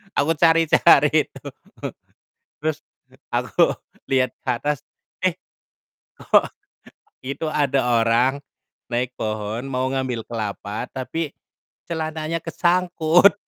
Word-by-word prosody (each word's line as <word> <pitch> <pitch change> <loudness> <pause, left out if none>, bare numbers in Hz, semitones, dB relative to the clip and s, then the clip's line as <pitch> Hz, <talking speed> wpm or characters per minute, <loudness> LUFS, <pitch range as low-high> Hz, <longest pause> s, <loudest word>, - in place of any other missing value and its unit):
aku 150 +3 +2
cari-cari 165 -1 +5
itu, - - -14 1.2
terus 155 -1 0 0.5
aku - - +2 0.4
liat 130 -2 +3
ke - - -12
atas, 145 +4 0 0.5
eh - - +3 0.8
kok - - +3 0.8
itu 140 +4 -4
ada 140 -2 +2 0.2
orang 120 +5 +2 0.5
naik 125 +1 -1
pohon, 110 +2 -3
mau 130 0 -1
ngambil 130 -4 -2
kelapa, 105 0 -4
tapi 145 +4 -3 0.6
celananya 160 0 -3
kesangkut. 175 +1 +3
135 Hz, 95 wpm, -22 LUFS, 120-160 Hz, 1.2 s, cari-cari